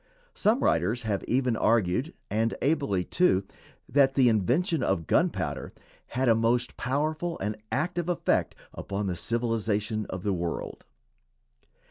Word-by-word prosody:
Some 220 +6 +2
writers 100 +9 +1
have 105 -3 -1
even 125 -1 +1
argued, 115 - +1 0.2
and 110 +2 +1
ably 135 - +1
too, 130 - +2 0.4
that 135 0 +3
the 130 -3 +5
invention 130 - +1
of 95 -9 0
gunpowder - - 0 0.4
had 130 0 +2
a 115 - +6
most 120 +2 +1
powerful 155 +6 -1
and 105 +2 -3 0.2
active 175 +4 -1
effect 175 - 0 0.2
upon 100 +1 -4
the 90 -2 -2
civilization 110 0 -1
of 95 -1 -5
the 100 - 0
world. 85 -2 -4
115 Hz, 130 wpm, -27 LUFS, 100-140 Hz, 0.4 s, a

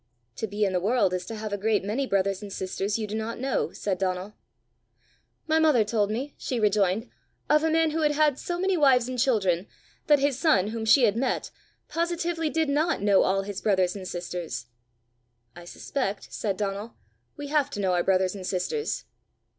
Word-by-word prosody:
"To 220 - -2
be 205 +1 0
in 190 - -1
the 180 - +2
world 205 0 +2
is 180 0 -3
to 225 - -5
have 215 -1 -5
a 205 - -2
great 215 0 +1
many 230 +7 -1
brothers 195 -1 0
and 205 -1 -8
sisters 195 +2 -2
you 220 - -2
do 210 - -7
not 220 +1 -3
know!" 265 +2 -1
said 190 -3 -3
Donal. 185 +2 -2 1.1
"My 315 0 +2
mother 305 -8 +4
told 210 -1 0
me," 260 +7 -3
she 250 - -2
rejoined, 210 +1 +2 0.4
"of 300 +1 +4
a 320 - +2
man 320 0 +2
who 320 +1 -1
had 300 -1 +3
had 295 -2 +2
so 350 0 -3
many 380 +1 +1
wives 265 -6 +4
and 255 -1 -4
children 200 -8 +2 0.4
that 295 - +6
his 275 -2 0
son, 215 - +3
whom 225 0 -4
she 245 +4 +6
had 215 -3 +4
met, 255 +3 -1 0.4
positively 335 -1 -1
did 320 0 0
not 295 - +1
know 200 -2 +5
all 195 +1 +1
his 200 0 -6
brothers 185 -3 +2
and 190 -2 -6
sisters." 175 -9 -5 0.9
"I 175 0 -11
suspect," 200 +2 -4
said 200 -4 -2
Donal, 205 +2 -4 0.4
"we 290 -1 -6
have 295 -2 +2
to 205 - -6
know 190 -2 +1
our 175 -1 +2
brothers 185 -1 +2
and 195 -2 -7
sisters." 200 - -2
215 Hz, 200 wpm, -26 LUFS, 195-285 Hz, 1.1 s, that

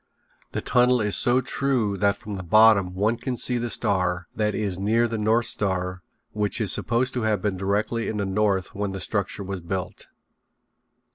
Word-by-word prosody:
The - - -2
tunnel 125 0 +3
is 105 -2 +1
so 125 +1 +4
true 125 -5 -1
that 100 0 +1
from 105 -2 -7
the 95 - -5
bottom 100 0 +4
one 105 +5 +1
can 125 +1 -4
see 125 0 +1
the 120 0 -3
star, 90 -5 0
that 105 -1 0
is 100 -4 -2
near 115 +4 +2
the 115 -1 -4
North 110 +2 +2
Star, 90 -2 -2 0.3
which 105 +1 0
is 105 -4 +2
supposed 125 +2 0
to 125 - -2
have 110 -2 +1
been 100 0 -2
directly 100 +4 -1
in 110 - -3
the 100 - -1
north 95 -1 0
when 100 -1 -3
the 95 - -5
structure 100 0 -2
was 95 -1 -5
built. 90 +1 -5
105 Hz, 190 wpm, -24 LUFS, 95-115 Hz, 0.3 s, so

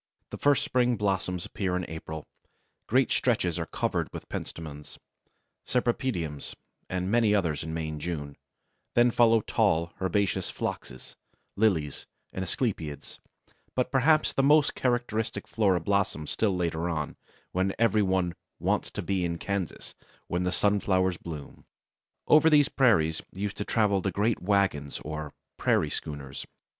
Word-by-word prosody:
The - - -5
first 145 -1 +3
spring 125 -1 +2
blossoms 95 -3 -1
appear 95 -3 -2
in 90 -1 -2
April; 80 -1 -7 0.6
great 130 +2 +3
stretches 90 -9 +1
are 80 - -3
covered - - -1
with - - -8
Pentstemons, 75 -3 -7 0.7
Cypripediums, 120 - -1 0.3
and 90 +1 -2
many 115 -3 +4
others 85 -7 0
in 80 - -5
May 80 -1 -3
and 75 -1 -6
June; 75 -4 -4 0.6
then 120 0 +5
follow 115 -1 +5
tall, 85 -3 +1
herbaceous 95 +1 0
Phloxes, 65 - -6 0.4
Lilies, 85 -9 +1 0.3
and 95 - -3
Asclepiads, 85 - -3 0.6
but 125 0 0
perhaps 150 +4 +3
the - - +2
most 145 +2 +5
characteristic 120 -3 -1
flora 100 -5 +2
blossoms 95 -4 0
still 105 -4 +1
later 85 -1 -1
on, 75 -3 -3 0.4
when 95 +1 0
every 110 -2 +3
one 95 -3 +1 0.2
"wants - - 0
to - - -5
be 95 -2 0
in 85 -1 -1
Kansas 100 -1 -4 0.3
when 90 - -1
the 90 - +1
Sunflowers 95 -3 +2
bloom." 80 -5 -8 0.6
Over 155 +1 +6
these 145 -2 +5
prairies 80 - +3
used 100 +2 -4
to 105 - -3
travel 105 -4 +2
the 95 - 0
great 105 +5 0
wagons 90 -7 +1
or 75 -1 -5 0.3
"prairie - - +2
schooners." 70 -3 -6
95 Hz, 140 wpm, -28 LUFS, 80-110 Hz, 0.7 s, Over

